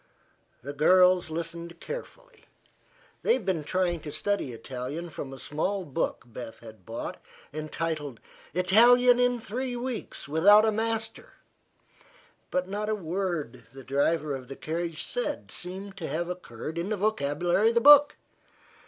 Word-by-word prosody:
The 140 +2 -5
girls 180 +3 +5
listened 170 +1 -5
carefully. - - -9 0.8
They - - +3
had 250 -7 -2
been 180 -5 0
trying 175 +1 0
to 150 -1 -8
study 155 -2 -1
Italian 130 +8 -6
from 135 -3 -6
a 135 - -8
small 185 +8 -2
book 140 - -2
Beth 120 -1 -9
had 110 -5 -13
bought 115 +1 -6 0.3
entitled 155 -3 -4 0.3
"Italian 240 +8 +5
in 245 -1 +2
Three 245 +3 -4
Weeks 245 - -5
without 200 +9 +6
a 220 - +3
Master," 225 +1 -3 1.2
but 180 0 -1
not 210 +2 -3
a 215 - +1
word 175 - -3
the 135 0 -11
driver 145 +2 0
of 130 -2 -6
the 135 - -7
carriage 165 +1 -4
said - - -3
seemed 190 +2 -6
to 165 - -4
have 170 +2 -2
occurred 165 -3 -6
in 175 +4 -3
the 215 - -1
vocabulary 180 0 +1
of 230 - -2
the 235 - +4
book. 290 +2 +8
175 Hz, 145 wpm, -28 LUFS, 150-215 Hz, 1.2 s, book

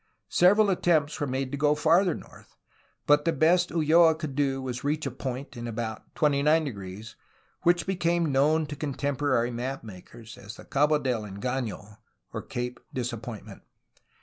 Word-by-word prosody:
Several 200 +3 +5
attempts 160 -5 +1
were 145 - -1
made 130 0 -2
to 140 - -4
go 150 0 +3
farther 165 +4 +3
north, - - -14 0.5
but 145 0 +4
the 165 - +2
best 170 +4 +3
Ulloa 160 0 +4
could 155 -3 -5
do 135 -2 0
was 125 -2 -4
to 140 - -4
reach 150 +1 -1
a 135 - -2
point 130 +2 -6
in 120 0 -6
about 110 -1 -6
29 140 - +1 0.6
which 175 -1 +2
became 170 -4 0
known 150 +4 +3
to 145 0 -7
contemporary 140 -4 -1
map 125 +3 -4
makers 110 +2 -12
as 105 +4 -10
the - - -13
Cabo 150 +2 +2
del 125 -6 -1
Engaiio 105 0 -5 0.5
(Cape 125 0 -4
Disappointment). 120 -3 -6
140 Hz, 150 wpm, -27 LUFS, 120-155 Hz, 0.6 s, Several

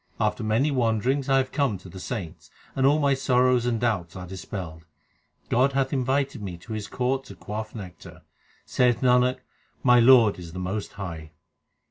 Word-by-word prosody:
After 110 +1 0
many 115 +8 +1
wanderings 130 +2 0
I 135 - +4
have 130 -1 0
come 140 -9 0
to 95 - -14
the 95 +2 -10
saints, 90 -5 -6 0.3
And 135 0 +3
all 145 +2 +4
my 140 -2 +2
sorrows 125 -2 +2
and 115 -2 0
doubts 100 -8 -1
are 90 -1 -7
dispelled. 90 -3 -7 0.6
God 130 +3 +2
hath 135 0 0
invited 135 0 0
me 95 -4 -6
to 110 +6 -9
His 105 -1 -4
court 130 +3 -1
to 100 - -11
quaff 110 +5 -6
nectar. 90 -6 -10 0.4
Saith 125 -2 +2
Nanak, 125 0 +3 0.4
my 125 -1 +6
Lord 115 -5 +6
is 85 -2 -10
the - - -7
most 95 +3 -4
high. 80 -5 -7
115 Hz, 175 wpm, -25 LUFS, 95-130 Hz, 0.6 s, my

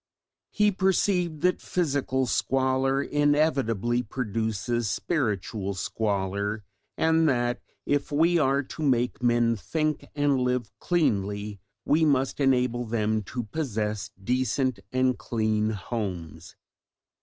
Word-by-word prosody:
He 210 0 +3
perceived 185 -4 +1
that 180 0 +2
physical 140 -6 0
squalor 135 +2 +1
inevitably 135 -6 +1
produces 115 -1 -2
spiritual 105 - -1
squalor, 100 +1 -2 0.3
and 160 0 +3
that 120 -1 0 0.2
if 145 +1 0
we 165 +4 +3
are 140 -1 +2
to 145 - -9
make 125 -5 +1
men 120 -1 +3
think 155 - -2
and 145 -2 +2
live 125 -4 -1
cleanly 105 - 0 0.3
we 155 +2 +3
must 135 -3 +2
enable 125 -3 +2
them 110 -1 0
to 120 +3 -4
possess 110 -5 -3
decent 130 +2 0
and 130 -1 +1
clean 110 -2 0
homes. 90 -7 -5
125 Hz, 110 wpm, -26 LUFS, 110-145 Hz, 0.3 s, He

